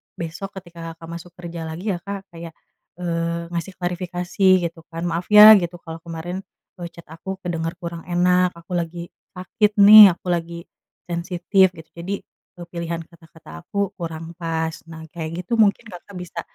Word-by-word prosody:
besok 170 +4 -7
ketika 170 -3 -9
Kakak 165 0 -12
masuk 175 +1 -14
kerja 170 -2 -7
lagi 175 +6 -4
ya 175 - -3
Kak, 195 +1 -8
kayak, 165 -1 -10 0.4
eee, 170 -1 -3
ngasih 175 +2 -4
klarifikasi 180 +1 -4 0.2
gitu 170 0 -13
kan. 165 0 -6
"Maaf 170 +1 -2
ya," 210 +1 +10
gitu, 175 -1 -4
"kalau 165 0 -8
kemarin 170 +2 -6 0.4
e 175 - -6
chat 170 - -13
aku 190 +4 -7
kedengar 165 -2 -3
kurang 170 -1 -6
enak. 180 +1 +2
Aku 170 +1 -5
lagi 170 0 -4 0.2
sakit 205 +3 0
nih, 205 -2 +11
aku 180 - -14
lagi 170 -1 -2 0.5
sensitif," 180 +2 +2
gitu. 160 -2 -14
"Jadi 185 +4 -4 0.4
e - - -11
pilihan 170 -1 -4
kata-kata 160 - -14
aku 200 -1 -2
kurang 165 -1 -6
pas." 165 -1 -2 0.2
Nah, 160 0 -9
kayak 160 -1 -6 0.2
gitu 235 - -1
mungkin 215 +1 +3
Kakak 180 +1 -12
bisa 180 -1 -6
170 Hz, 165 wpm, -22 LUFS, 165-185 Hz, 0.5 s, nih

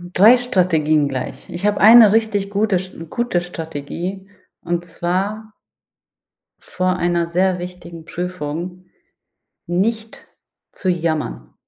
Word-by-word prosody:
3 220 +7 +7
Strategien 160 - +1
gleich. 135 +7 -6
Ich 175 +2 -5
habe 210 -1 +1
eine 220 0 +8
richtig 215 -3 +1
gute 205 -1 +1
Sch 185 +1 -9 0.2
gute 240 -6 -1
Strategie 175 +3 -6 0.3
und 175 0 -2
zwar 195 +6 -3 1.1
vor 185 0 -2
einer 175 -1 +1
sehr 180 +2 +1
wichtigen 175 -2 -9
Prüfung 180 +1 -5 0.8
nicht 220 +6 -2 0.5
zu 190 - -4
jammern. 160 - -3
180 Hz, 110 wpm, -19 LUFS, 170-205 Hz, 1.1 s, eine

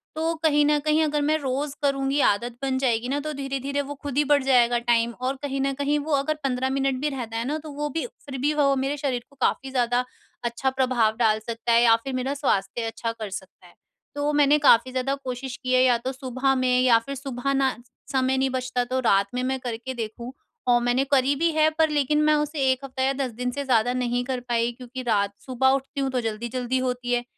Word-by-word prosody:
तो 325 +1 0
कहीं 295 -2 +4
न 295 0 +3
कहीं, 305 +1 +2
अगर 295 -1 0
मैं 305 +2 +2
रोज़ 275 +1 -2
करूँगी 275 0 +1
आदत 235 +4 +1
बन 265 -1 0
जाएगी 245 -2 0
ना, 285 +1 0
तो 305 +1 -4
धीरे-धीरे 275 +1 -3
वो 285 +1 -6
खुद 285 -1 -4
ही 295 - +5
बढ़ 285 -2 +4
जाएगा 245 -2 +4
टाइम 235 -1 +2
और 260 +2 -1
कहीं 275 -1 -2
न 275 0 0
कहीं 285 +2 0
वो 305 +2 -5
अगर 280 +3 0
15 260 0 0
मिनट 270 0 0
भी 300 - +1
रहता 235 -5 -5
है 230 - -2
ना। 300 +2 -1
तो 305 - -8
वो 295 +1 -3
भी 325 - -3 0.2
फिर 270 -2 -6
भी 295 +2 +2
वो 280 -2 +3
मेरे 270 +2 -1
शरीर 255 -4 -2
को 280 - -22
काफी 270 +2 0
ज़्यादा 245 -1 +1 0.4
अच्छा 240 +3 -1
प्रभाव 250 -4 +1
डाल 220 -2 +3
सकता 230 +1 -3
है, 230 0 +5
या 225 -1 +6
फिर 260 +3 -6
मेरा 255 +2 -1
स्वास्थ्य 240 -5 -1
अच्छा 230 0 -3
कर 220 -3 -7
सकता 190 0 -9
है। - - -20 0.4
तो 290 +1 0
मैंने 295 0 +5
काफी 255 -2 +5
ज़्यादा 260 +1 -1
कोशिश 255 0 -5
की 255 0 0
है 255 - +5
या 245 -2 +4
तो 255 +3 -4
सुबह 265 0 -1
में 250 -1 +2
या 245 -3 +6
फिर 275 0 -5
सुबह 270 0 -3
ना, 270 -1 +1 0.4
समय 260 0 +1
नहीं 265 0 +1
बचता 255 -1 -1
तो 260 +1 -1
रात 200 -5 +3
में 250 - -1
मैं 265 0 -1
करके 245 +1 -5
देखूँ। 235 +1 -6 0.4
और 240 -1 +5
मैंने 245 +2 +2
करी 275 +1 +3
भी 335 +3 +1
हैं। 310 0 +3
पर 320 -1 +4
लेकिन 300 0 +1
मैं 305 0 +4
उसे 300 0 -2
1 260 +1 -2
हफ्ता 260 0 -3
या 270 +1 +2
10 265 -3 -2
दिन 250 +2 -3
से 280 +2 -4
ज़्यादा 245 -2 +2
नहीं 245 -1 -1
कर 255 -1 -2
पाई, 240 -1 0
क्योंकि 250 +1 -8
रात 200 -4 +1
सुबह 265 0 +2
उठती 275 +1 -1
हूँ, 270 - 0
तो 250 -1 0
जल्दी-जल्दी 235 +3 -2
होती 250 -1 -2
है। 240 0 +1
260 Hz, 235 wpm, -25 LUFS, 245-280 Hz, 0.4 s, या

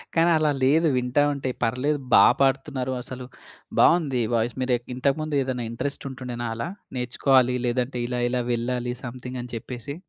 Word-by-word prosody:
కానీ 165 +1 +4
అలా 155 -1 +2
లేదు 155 +5 +4
వింటా 125 +3 +2
ఉంటే 135 -2 -3
పర్లేదు 135 +6 0
బా - - +9 0.2
పాడుతున్నారు 135 -1 +1
అసలు. 125 0 -8 0.5
బావుంది 145 -8 +4
వాయిస్ 115 0 0
మీరేక్ 125 -2 0
ఇంతకు 135 +2 +1
ముందు 155 -1 -2
ఏదైనా 130 -2 -2
ఇంట్రెస్ట్ 140 +5 -4
ఉంటుండేనా 125 -2 -5
అలా? 115 +8 -3 0.3
నేర్చుకోవాలి 125 +1 +2
లేదంటే 125 +1 -1
ఇలా 125 0 -2
ఇలా 125 0 0
వెళ్ళాలి 120 +1 -2
సమ్ 125 0 -6
థింగ్ 125 0 -5
అని 125 - -10
చెప్పేసి? 125 +4 -6
125 Hz, 160 wpm, -25 LUFS, 125-140 Hz, 0.5 s, బా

